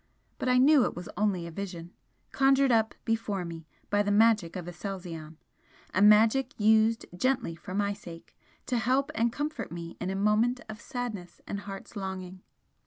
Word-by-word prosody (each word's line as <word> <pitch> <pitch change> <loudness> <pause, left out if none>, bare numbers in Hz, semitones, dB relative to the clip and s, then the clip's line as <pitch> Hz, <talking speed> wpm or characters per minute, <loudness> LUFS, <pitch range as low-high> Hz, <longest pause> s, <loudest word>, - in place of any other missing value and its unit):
But 255 - -1
I 250 - +4
knew 275 +1 +6
it - - -1
was 175 - -7
only 200 -5 0
a 170 - -7
vision 175 -1 -7 0.4
conjured 270 0 +4
up 220 -1 +2
before 220 -5 -1
me 165 -2 -8 0.2
by 205 0 +3
the 205 - -1
magic 210 -4 +3
of 180 -2 -5
Aselzion, 175 -4 -7 0.6
a 185 - +2
magic 225 +6 +5
used 220 +1 +4
gently 255 -4 0
for 185 +3 -8
my 200 0 +1
sake, 170 -5 -12 0.3
to 245 -2 0
help 265 +5 +1
and 230 -2 +1
comfort 295 +5 -4
me 170 0 -7
in 180 - -2
a 190 - -2
moment 215 +5 +2
of 220 +1 -8
sadness 240 -9 -6
and 200 - -4
heart's 200 +2 -9
longing. 190 -2 -6
205 Hz, 175 wpm, -29 LUFS, 180-235 Hz, 0.6 s, knew